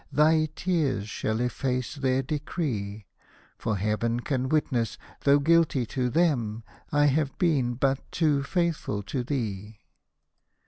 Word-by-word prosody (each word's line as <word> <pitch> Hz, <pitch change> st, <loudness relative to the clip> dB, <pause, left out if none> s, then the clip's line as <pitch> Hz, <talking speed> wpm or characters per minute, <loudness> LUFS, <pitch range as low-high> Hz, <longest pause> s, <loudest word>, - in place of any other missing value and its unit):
Thy 155 Hz, +2 st, +4 dB
tears 150 Hz, -, 0 dB
shall 110 Hz, +1 st, -2 dB
efface 125 Hz, 0 st, -1 dB
their 135 Hz, -2 st, 0 dB
decree; 125 Hz, -, -3 dB, 0.5 s
For 110 Hz, -3 st, -1 dB
Heaven 110 Hz, +4 st, 0 dB
can 130 Hz, -1 st, -1 dB
witness, 130 Hz, -7 st, 0 dB, 0.3 s
though 140 Hz, 0 st, +6 dB
guilty 155 Hz, -3 st, +3 dB
to 125 Hz, +2 st, -1 dB
them, 120 Hz, -8 st, +1 dB, 0.3 s
I 145 Hz, -1 st, +4 dB
have 145 Hz, 0 st, +1 dB
been 135 Hz, -9 st, +1 dB
but 135 Hz, +1 st, -1 dB
too 150 Hz, -4 st, +2 dB
faithful 160 Hz, -, -1 dB
to 125 Hz, +5 st, -3 dB
thee. 110 Hz, -6 st, -4 dB
135 Hz, 125 wpm, -27 LUFS, 115-150 Hz, 0.5 s, though